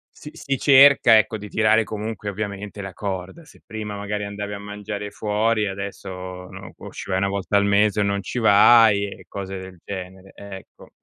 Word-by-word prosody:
Si 150 Hz, -, -11 dB
si 135 Hz, -1 st, -3 dB
cerca 135 Hz, -4 st, +6 dB
ecco, 110 Hz, +1 st, +1 dB
di 105 Hz, 0 st, -9 dB
tirare 110 Hz, 0 st, +3 dB
comunque 105 Hz, -1 st, -5 dB
ovviamente 100 Hz, 0 st, -6 dB
la 95 Hz, -2 st, -7 dB
corda: 95 Hz, -, -6 dB
se -, -, -19 dB
prima 105 Hz, -1 st, -6 dB
magari 105 Hz, 0 st, -4 dB
andavi 100 Hz, 0 st, -6 dB
a 100 Hz, -, -6 dB
mangiare 105 Hz, 0 st, -7 dB
fuori 105 Hz, 0 st, 0 dB
adesso 100 Hz, 0 st, -6 dB, 0.4 s
non -, -, -11 dB
può -, -, -11 dB
ci -, -, -9 dB
vai 95 Hz, 0 st, 0 dB
1 100 Hz, -, 0 dB
volta 100 Hz, +1 st, -1 dB
al 100 Hz, -, +2 dB
mese 105 Hz, +1 st, +2 dB
o -, -, +3 dB
non 100 Hz, 0 st, -1 dB
ci 125 Hz, -, -4 dB
vai, 110 Hz, -1 st, +6 dB
e 100 Hz, -, -10 dB
cose 95 Hz, -1 st, -6 dB
del 95 Hz, -2 st, -11 dB
genere, 95 Hz, 0 st, -8 dB
ecco. 100 Hz, -1 st, -12 dB
100 Hz, 190 wpm, -22 LUFS, 100-110 Hz, 0.4 s, cerca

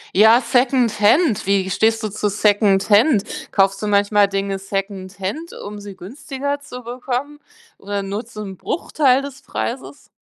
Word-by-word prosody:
Ja, 220 Hz, +5 st, +6 dB
Secondhand. 245 Hz, -, +2 dB
Wie 195 Hz, -1 st, +1 dB
stehst 225 Hz, +3 st, +1 dB
du 215 Hz, -, -1 dB
zu 210 Hz, +1 st, -2 dB
Secondhand? 205 Hz, +3 st, +3 dB, 0.3 s
Kaufst 195 Hz, 0 st, +2 dB
du 210 Hz, -, -2 dB
manchmal 205 Hz, 0 st, +3 dB
Dinge 195 Hz, 0 st, -2 dB
Secondhand, 195 Hz, -, -5 dB
um 205 Hz, 0 st, -7 dB
sie 200 Hz, -1 st, -10 dB
günstiger 280 Hz, -, -5 dB
zu 250 Hz, -3 st, -10 dB
bekommen? 255 Hz, +4 st, -5 dB, 0.4 s
Oder 200 Hz, 0 st, -4 dB
nur 200 Hz, +4 st, -4 dB
zum 205 Hz, -3 st, -8 dB
Bruchteil 275 Hz, -5 st, +1 dB
des 275 Hz, -1 st, -9 dB
Preises? 130 Hz, -, -6 dB
210 Hz, 135 wpm, -20 LUFS, 195-250 Hz, 0.4 s, Ja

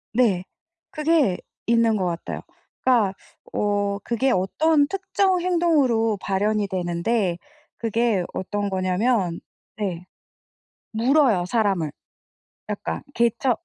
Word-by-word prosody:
네. 215 Hz, -7 st, +3 dB, 0.5 s
그게 305 Hz, -, +2 dB, 0.3 s
있는 230 Hz, -1 st, +3 dB
것 190 Hz, -3 st, 0 dB
같아요. 170 Hz, -1 st, -4 dB, 0.4 s
그러니까 230 Hz, -7 st, +3 dB, 0.4 s
어 205 Hz, -1 st, 0 dB
그게 255 Hz, +3 st, +1 dB
어떤 285 Hz, -, +2 dB
특정 380 Hz, +1 st, +1 dB
행동으로 295 Hz, -, +2 dB
발현이 205 Hz, +1 st, 0 dB
되는데 180 Hz, +1 st, -1 dB, 0.4 s
그게 225 Hz, -4 st, +1 dB
어떤 205 Hz, +2 st, -2 dB
거냐면 185 Hz, 0 st, 0 dB, 0.4 s
네 180 Hz, -5 st, -3 dB, 0.9 s
물어요 235 Hz, -, +3 dB
사람을. 195 Hz, -8 st, 0 dB, 0.8 s
약간 -, -, -3 dB
개 235 Hz, 0 st, +4 dB
처 265 Hz, -, +1 dB
220 Hz, 210 characters per minute, -23 LUFS, 190-255 Hz, 0.9 s, 개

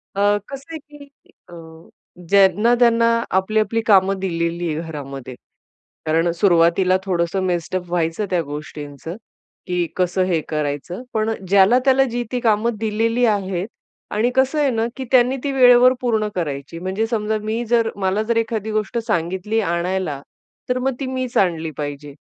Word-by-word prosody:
अ, 205 Hz, +1 st, +3 dB
कसं 275 Hz, +4 st, -9 dB
आहे, 320 Hz, -, -5 dB
की 295 Hz, -1 st, -15 dB, 0.4 s
अ, -, -, -13 dB, 0.8 s
ज्यांना-त्यांना 230 Hz, +5 st, +4 dB, 0.3 s
आपली, 215 Hz, +3 st, +1 dB
आपली 225 Hz, +1 st, 0 dB
कामं 195 Hz, -2 st, +4 dB
दिलेली 170 Hz, -2 st, -2 dB
आहे 155 Hz, -, -3 dB
घरामध्ये. 135 Hz, -4 st, -7 dB, 0.7 s
कारण 165 Hz, +2 st, +2 dB
सुरुवातीला 175 Hz, 0 st, +3 dB
थोडंसं 175 Hz, 0 st, 0 dB
मेस्टप 180 Hz, 0 st, -2 dB
व्हायचं 170 Hz, +3 st, -1 dB
त्या 180 Hz, -2 st, +1 dB
गोष्टींचं, 145 Hz, +1 st, -8 dB, 0.5 s
की 180 Hz, -1 st, 0 dB
कसं 185 Hz, 0 st, +1 dB
हे 175 Hz, -3 st, +1 dB
करायचं. 150 Hz, -, -3 dB
पण 220 Hz, 0 st, 0 dB, 0.2 s
ज्याला-त्याला 250 Hz, +8 st, +4 dB
जी-ती 240 Hz, +1 st, -3 dB
कामं 225 Hz, 0 st, +1 dB
दिलेली 225 Hz, +2 st, +1 dB
आहेत 195 Hz, -4 st, -1 dB, 0.4 s
आणि 215 Hz, +4 st, +1 dB
कसं 265 Hz, +3 st, +2 dB
आहे 290 Hz, -2 st, +3 dB
ना, 225 Hz, -2 st, 0 dB
की 265 Hz, -, -5 dB
त्यांनी 255 Hz, +1 st, +4 dB
ती 285 Hz, -, -1 dB
वेळेवर 250 Hz, -1 st, +6 dB
पूर्ण 220 Hz, -4 st, 0 dB
करायची. 145 Hz, -2 st, -4 dB
म्हणजे 190 Hz, +5 st, -2 dB
समजा 220 Hz, -1 st, -1 dB
मी 220 Hz, +2 st, -2 dB
जर 230 Hz, -1 st, +2 dB
मला 195 Hz, +1 st, 0 dB
जरी 230 Hz, 0 st, +1 dB
कधी 220 Hz, -1 st, -3 dB
गोष्ट 215 Hz, +1 st, -2 dB
सांगितली 190 Hz, +3 st, -1 dB
आणायला, 175 Hz, -5 st, -2 dB, 0.5 s
तर 250 Hz, -, +1 dB
मग 265 Hz, +1 st, 0 dB
ती 275 Hz, -, -3 dB
मीच 255 Hz, -1 st, -3 dB
आणली 165 Hz, -4 st, +1 dB
पाहिजे. 145 Hz, -1 st, -6 dB
200 Hz, 150 wpm, -20 LUFS, 170-235 Hz, 0.8 s, वेळेवर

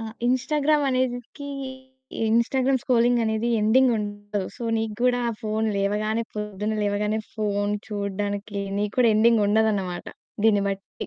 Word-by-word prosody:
ఆ! -, -, -5 dB, 0.2 s
Instagram 290 Hz, +4 st, +2 dB
అనేదికి, 255 Hz, +2 st, -2 dB, 0.8 s
Instagram 255 Hz, +3 st, +2 dB
scrolling 240 Hz, -1 st, +3 dB
అనేది 220 Hz, +2 st, 0 dB
ending 250 Hz, +4 st, +4 dB
ఉండదు. 205 Hz, 0 st, -4 dB, 0.2 s
సో -, -, -9 dB, 0.2 s
నీకు 220 Hz, -1 st, -2 dB
గూడా 245 Hz, -1 st, +3 dB
ఆ -, -, -3 dB
ఫోను 220 Hz, +1 st, 0 dB
లేవగానే, 215 Hz, +3 st, 0 dB
పొద్దున్న 210 Hz, 0 st, -3 dB
లేవగానే 210 Hz, +1 st, 0 dB, 0.2 s
ఫోను 205 Hz, -1 st, 0 dB
చూడడానికి 205 Hz, 0 st, -3 dB, 0.2 s
నీకు 210 Hz, 0 st, -2 dB
కూడా 235 Hz, -3 st, +5 dB
ఎండింగ్ 225 Hz, 0 st, +4 dB
ఉండదన్నమాట. 205 Hz, -4 st, +1 dB, 0.4 s
దీన్ని 205 Hz, -2 st, +4 dB
బట్టి. 195 Hz, 0 st, -6 dB
220 Hz, 130 wpm, -24 LUFS, 205-245 Hz, 0.8 s, కూడా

